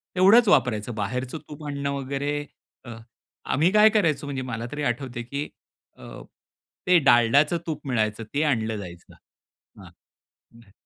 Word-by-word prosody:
तेवढच 205 +6 +6
वापरायचं. 120 - +1
बाहेरचं 125 +7 -4
तूप 150 +1 -10
आणणं 140 -1 -3
वगैरे 140 +2 -3 0.4
अ, 120 - -9 0.5
आम्ही 160 +6 +1
काय 215 +1 +6
करायचो, 165 -9 0
म्हणजे 135 -2 -4
मला 115 -2 -5
तरी 145 0 -4
आठवतंय 120 -1 -3
की 140 +5 -5 0.5
अ, - - -11 0.7
ते 180 - +6
डालडाचं 135 +4 +4
तूप 150 -3 -5
मिळायचं 110 -3 -1
ते 145 - +1
आणलं 110 -7 0
जायचं. 90 -4 -11 0.7
हां. - - -13 0.6
हं. 115 -4 -19
140 Hz, 140 wpm, -24 LUFS, 120-150 Hz, 0.7 s, तेवढच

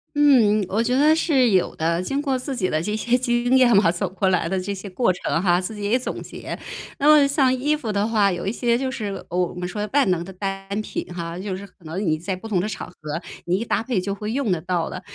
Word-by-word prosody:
嗯， 250 -8 +5
我 215 +5 0
觉 245 +1 0
得 295 +4 +5
是 275 -7 +3
有 185 -2 +2
的， 165 +2 0
经 275 +10 -2
过 275 -3 0
自 260 +2 -4
己 190 -8 -1
的 155 - 0
这 210 +5 -2
些 240 +3 +2
经 245 0 +2
验 250 -2 +5
嘛， 195 -4 +5
走 175 +2 -1
过 190 +1 -1
来 185 -2 +2
的 190 - 0
这 200 +2 -3
些 195 +1 -8
过 185 +2 +1
程 170 -2 -1
哈， 180 -1 +3
自 190 +4 -5
己 205 -1 -4
也 240 - +4
总 255 - -4
结。 - - -7 0.4
那 285 - +2
么 300 -2 +7
像 275 -2 +3
衣 290 +4 +1
服 225 -8 -4
的 200 0 +1
话， 215 -3 +3
有 175 -2 -3
一 195 - 0
些 235 0 +1
就 260 +1 -2
是， 210 -7 -5
呃， 175 - -3
我 180 -1 0
们 180 0 -4
说 210 +4 -4
万 280 -6 +4
能 175 -2 0
的 190 - -9
单 195 +1 -4
品 - - -5
哈， 170 0 -5
就 190 0 -4
是 195 +2 -8
可 180 -3 -21
能 180 +6 -3
你 155 -2 +1
在 185 +4 -3
不 185 - -12
同 195 -4 +1
的 185 - -1
场 215 - -6
合， 180 - -20 0.5
你 175 +1 +1
一 - - -2
搭 230 - 0
配 230 -4 -1
就 200 +2 -2
会 210 +2 -4
用 260 -5 0
得 180 - +1
到 175 -1 -1
的， 185 - -6
205 Hz, 295 characters per minute, -23 LUFS, 185-250 Hz, 0.5 s, 么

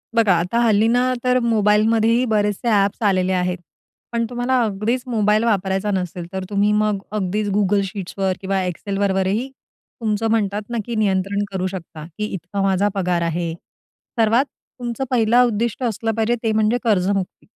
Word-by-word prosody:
बघा, 220 -5 +4
आता 180 +8 0
हल्ली 220 -2 +3
ना, 250 +2 +2
तर 250 0 +3
मोबाईलमध्येही 225 +1 +3
बरेचसे 210 +2 0
अ‍ॅप्स 200 +1 +2
आलेले 185 -1 +1
आहेत. 180 0 0 0.5
पण 235 0 0
तुम्हाला 245 +1 0
अगदीच 220 +4 -1
मोबाईल 215 -2 +2
वापरायचा 195 -2 0
नसेल, 180 -2 -3
तर 190 0 -3
तुम्ही 205 +1 +2
मग 210 -1 +1
अगदीच 210 0 -1
Google 200 0 +2
Sheetsवर 195 -1 -2
किंवा 195 0 -1
Excelवर 195 +2 -1
वरही 205 +8 0 0.5
तुमचं 220 0 0
म्हणतात 210 -2 0
ना, 235 - -2
की 235 - -4
नियंत्रण 200 -1 0
करू 185 -1 -1
शकता, 170 -4 -8
की 210 - -1
इतका 190 +2 -4
माझा 195 +1 +2
पगार 180 -2 0
आहे. 170 0 -1 0.7
सर्वात 230 +5 +4 0.3
तुमचं 240 +1 -3
पहिलं 240 +1 +4
उद्दिष्ट 235 +2 -1
असलं 225 -1 -1
पाहिजे, 225 +1 +1
ते 225 - +1
म्हणजे 220 +2 +2
कर्जमुक्ती. 195 -3 0
210 Hz, 155 wpm, -21 LUFS, 190-230 Hz, 0.7 s, बघा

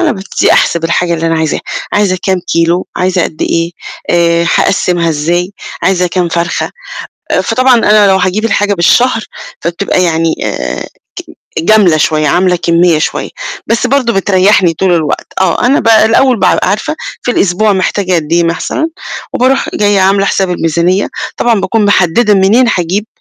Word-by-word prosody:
أنا 330 -5 +1
بابتدي 195 -2 -1
أحسب 170 -1 +1
الحاجة 170 +1 0
اللي 165 0 -2
أنا 165 - 0
عايزاها، 160 -1 -1 0.3
عايزة 195 -3 +1
كام 190 -1 0
كيلو؟ 170 +2 +1
عايزة 180 0 0
قد 155 - -4
إيه؟ 165 0 -1 0.4
آآ 170 0 +2
هاقسِّمها 175 -3 +1
إزاي؟ 170 +5 -1 0.3
عايزة 180 -2 +1
كام 175 0 -1
فرخة؟ 170 +1 -2 0.7
فطبعًا 255 0 +2
أنا 215 -3 +4
لو 190 - +3
هاجيب 190 +4 -1
الحاجة 205 -1 +1
بالشهر، 225 +6 +2 0.4
فبتبقى 175 +2 -1
يعني 165 -1 0
آآ 60 0 -4 0.7
ج - - -3
جَملة 195 -5 +4
شوية، 155 0 +1
عاملة 180 +4 +2
كمية 170 -1 +2
شوية، - - -2 0.4
بس 230 +2 0
برضو 250 -2 +1
بتريحني 190 -2 +2
طول 185 +2 0
الوقت. 155 -4 -2
آه، 190 +5 +1
أنا 275 - +2
ب 230 - -1
الأول 225 +4 +4
بابقى 185 0 +2
عارفة 305 +10 -2 0.3
في 245 - -1
الأسبوع 205 0 +1
محتاجة 190 0 -1
قد 160 -1 -2
إيه 170 0 +3
مثلًا، 180 - -2 0.4
وباروح 260 +2 +1
جاية 205 -1 +1
عاملة 195 +1 +2
حساب 190 -1 0
الميزانية، 175 +3 0 0.3
طبعًا 230 -4 +1
باكون 205 +3 0
محددة 205 +2 +2
منين 200 +6 +3
هاجيب، 185 +5 -2
185 Hz, 160 wpm, -11 LUFS, 170-210 Hz, 0.7 s, أنا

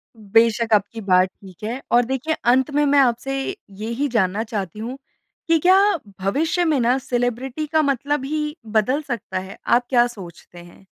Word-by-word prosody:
बेशक़, 225 +1 +2
आपकी 210 +3 -2
बात 185 -2 +3
ठीक 190 0 -16
है। 235 +5 -4
और 240 0 +4
देखिए, 265 +5 -2
अंत 255 +3 +3
में 295 +1 +2
मैं 285 0 +4
आपसे 270 +2 +1 0.4
यही 235 +6 -2
जानना 215 -4 0
चाहती 210 -4 -5
हूँ 240 +4 -5 0.5
कि 330 0 +4
क्या 370 +4 +5 0.4
भविष्य 315 - 0
में 310 -4 +2
न 245 +2 +3
सेलिब्रिटी 245 +3 -2
का 315 +1 +2
मतलब 280 0 0
ही 300 +1 -2
बदल 225 +6 +1
सकता 235 -6 -3
है। 190 +1 -9
आप 245 +1 +3
क्या 240 -2 +4
सोचते 180 -6 -12
हैं? 175 +2 -16
240 Hz, 170 wpm, -21 LUFS, 215-275 Hz, 0.5 s, क्या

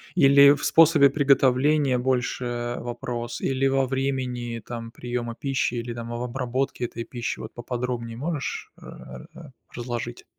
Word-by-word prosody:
Или 140 -2 +7
в 145 - -5
способе 155 -4 +6
приготовления 140 -1 +3
больше 120 -1 -1
вопрос? 120 0 -5
Или 135 0 +1
во 135 0 +2
времени 125 -3 -2
там, 115 -1 -7
приёма 120 -1 -4
пищи 135 -2 -1
или 120 0 -4
там, 115 0 -7
в 120 0 -4
обработке 125 0 -2
этой 115 0 -6
пищи? 120 -1 -5
Вот - - -8
поподробнее 120 -1 -4
можешь, 150 0 -4
э, - - -13
р - - -11
р - - -12 0.2
разложить? 120 -1 -5
125 Hz, 145 wpm, -25 LUFS, 120-135 Hz, 0.2 s, Или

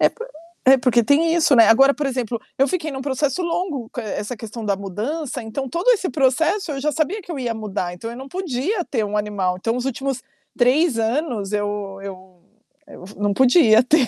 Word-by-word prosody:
É - - +6
por 475 +1 -9 0.4
é 265 - +9
porque 245 -2 +3
tem 320 +6 +3
isso, 325 -4 +4
né. 225 -2 +7
Agora, 270 +5 +6
por 295 -1 -2
exemplo, 245 -3 -2 0.2
eu 270 - +4
fiquei 320 -2 -2
em 275 - -6
um - - -4
processo 275 +4 -1
longo, 335 -8 -2
co - - -4
essa 215 +1 -4
questão 225 +1 -8
da 200 - +1
mudança, 235 - -4
então, 245 +4 -5
todo 340 - -2
esse 390 -5 -1
processo, 315 +6 +1
eu 275 - -4
já 300 +2 +1
sabia 325 +8 -1
que 350 - -12
eu 320 - -4
ia 240 -3 -2
mudar, 195 -5 -4
então, 225 +6 -7
eu 235 - -8
não 265 +2 -9
podia 355 - -2
ter 225 -5 -1
um 210 0 -3
animal, 205 -3 -1
então, 225 +5 -2
os 250 - -3
últimos 270 0 -3 0.4
3 255 +1 +3
anos, 225 -3 -1
eu 205 -1 -3
eu 190 -1 -10 0.5
eu 280 - -12
não 205 +1 0
podia 245 - +5
ter. 275 -2 +3
255 Hz, 215 wpm, -21 LUFS, 215-300 Hz, 0.5 s, é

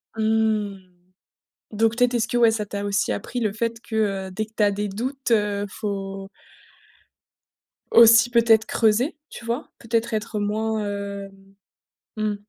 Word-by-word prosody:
Mmh, 220 -2 +1 0.9
donc 225 +1 +1
peut-être, 245 0 +2
est-ce 235 0 +1
que, 245 - -1
ouais, 230 -2 +5
ça 215 -2 -2
t'a 200 0 -5
aussi 200 0 0
appris 245 +4 -4
le 215 -3 -1
fait 230 0 -2
que, 220 - -7 0.3
heu, - - -10
dès 215 +4 -3
que 220 - -25
tu 210 - +3
as 205 - +4
des 205 +1 -2
doutes, 255 +5 -4
heu, 205 -2 +1
faut 195 -2 -5 1.6
aussi 230 0 +7
peut-être 230 -2 +4
creuser, 240 +8 +1
tu 235 - -10
vois? 235 +6 -3
Peut-être 230 0 -1
être 215 0 -2
moins, 215 +1 -1
hem, 200 -1 -7 0.6
mmh. 215 -1 -1
220 Hz, 155 wpm, -23 LUFS, 205-230 Hz, 1.6 s, aussi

